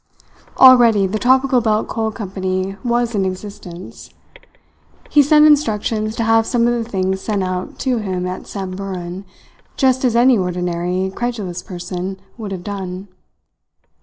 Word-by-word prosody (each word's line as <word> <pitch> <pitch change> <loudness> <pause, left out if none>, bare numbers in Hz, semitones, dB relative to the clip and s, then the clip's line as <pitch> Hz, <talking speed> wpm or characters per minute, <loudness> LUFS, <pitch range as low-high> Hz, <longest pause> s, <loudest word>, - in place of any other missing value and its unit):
Already 240 -6 +7
the 205 +3 -2
Tropical 260 +1 +3
Belt 215 -1 0
Coal 220 -1 -2
Company 190 -2 -3
was 240 -1 0
in 200 -2 0
existence. 185 -2 -7 1.0
He 295 - +6
sent 300 +2 +5
instructions 220 -7 +1
to 230 - -1
have 225 0 +3
some 240 -2 +1
of 240 - +2
the 235 -1 -3
things 190 -2 -1
sent 205 -3 -1
out 185 0 -4
to 255 -3 0
him 185 -4 -3
at 185 +1 -6
Samburan, 190 -1 -6 0.5
just 260 -1 +2
as 245 -3 +2
any 240 -1 +5
ordinary, 180 +1 -2
credulous 205 -7 -4
person 180 +1 -6 0.2
would 210 -3 -6
have 185 -2 -5
done. 190 -1 -6
200 Hz, 140 wpm, -18 LUFS, 185-235 Hz, 1.0 s, Already